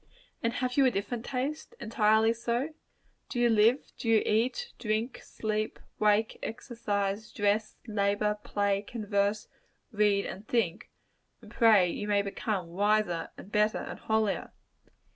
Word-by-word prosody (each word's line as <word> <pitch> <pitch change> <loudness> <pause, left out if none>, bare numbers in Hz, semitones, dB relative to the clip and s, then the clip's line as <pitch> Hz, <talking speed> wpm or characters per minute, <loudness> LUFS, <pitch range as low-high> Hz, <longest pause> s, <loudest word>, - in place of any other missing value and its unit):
And 230 0 0
have 250 0 -2
you 275 - +6
a - - +6
different 225 +2 -3
taste 285 - -3
entirely 220 0 +3
so? 240 +6 -2 0.6
Do 245 - -3
you 240 -1 +4
live 225 +5 +3
do 230 - -2
you 225 -1 +5
eat, 255 - 0
drink, 220 +2 -2
sleep, 215 0 -3 0.2
wake, 215 +1 +2
exercise, 215 -4 -3
dress, 205 +1 0
labor, 210 -1 0
play, 200 -1 0
converse, 205 -1 -1 0.4
read, 205 -2 +2
and 200 +3 -7
think, 205 -7 0 0.5
and - - -15
pray 215 -6 +5
that - - -4
you 210 - -3
may 205 -1 +2
become 200 -2 -3
wiser, 205 -1 +1
and 200 - -11
better, 210 0 +2
and - - -6
holier? 220 -2 0
215 Hz, 145 wpm, -29 LUFS, 205-230 Hz, 0.6 s, you